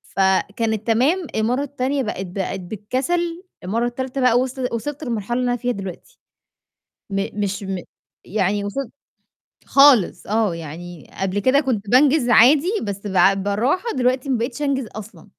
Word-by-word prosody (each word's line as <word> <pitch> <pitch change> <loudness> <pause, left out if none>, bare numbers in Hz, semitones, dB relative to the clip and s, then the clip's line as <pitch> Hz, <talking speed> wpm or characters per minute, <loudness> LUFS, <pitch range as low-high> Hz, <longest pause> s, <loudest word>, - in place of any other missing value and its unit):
فكانت 200 +3 +1
تمام، 290 +11 +2
المرّة 240 +5 +1
التانية 275 -1 -2
بقت 195 -3 -4
بقت 190 +1 -4
بالكسل، 265 - -2 0.2
المرّة 225 +6 -1
التالتة 260 +2 -4
بقى 245 -1 +4
وصل 260 0 -2
وصلت 290 +6 -4
للمرحلة 240 0 -2
اللي 250 - 0
أنا - - +1
فيها 245 +1 -1
دلوقتي، 195 - -8 0.9
م 195 0 -1
مش 205 0 -2
م 190 -1 -3 0.5
يعني 205 0 0
وصلت 265 +5 -4 0.8
خالص 275 -8 +5
آه، 215 -4 +1
يعني 165 +1 -9
قبل 195 +1 0
كده 260 +6 +3
كنت 225 -8 -2
بانجِز 265 +1 +4
عادي، 280 - +6
بس 200 0 -5
بع 190 0 +4
بالراحة 215 - 0
دلوقتي 255 +2 0
ما 255 - +2
بقيتش 235 +4 -4
أنجِز 270 -5 0
أصلًا. 215 -1 -10
230 Hz, 150 wpm, -21 LUFS, 200-265 Hz, 0.9 s, عادي